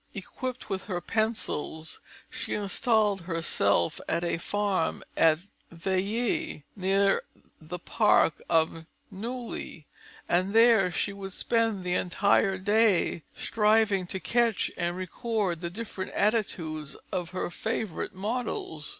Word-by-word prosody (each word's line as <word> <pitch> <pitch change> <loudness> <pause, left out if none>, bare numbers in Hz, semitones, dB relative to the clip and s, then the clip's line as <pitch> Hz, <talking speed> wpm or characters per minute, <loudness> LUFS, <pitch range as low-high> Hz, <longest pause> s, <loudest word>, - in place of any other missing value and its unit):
Equipped 255 +6 -5
with 195 -2 -3
her 185 -5 -2
pencils, 175 -7 -2 0.3
she - - -3
installed 210 0 +2
herself 160 - +1
at 170 +1 0
a 170 -1 0
farm 200 -2 0
at 160 +1 +4 0.3
Villiers, 200 - -1
near 195 +1 +3
to - - -26 0.2
the 160 +3 -6
park 195 -3 +3
of 160 0 +1 0.2
Neuilly, 230 -6 -6 0.4
and 185 +4 +1
there 225 -5 +6
she 200 +3 -1
would 195 -1 -7
spend 225 -4 0
the 180 0 -1
entire 195 +1 +2
day, 205 -3 +3
striving 210 -3 +2
to 190 - -4
catch 235 +1 +1
and 175 0 -1
record 185 -1 -2
the 170 - -2
different 195 0 -6
attitudes 165 -9 -1
of 180 -3 -2
her 185 -1 -3
favourite 220 -3 -3
models. 205 -7 -3
195 Hz, 120 wpm, -28 LUFS, 175-220 Hz, 0.4 s, there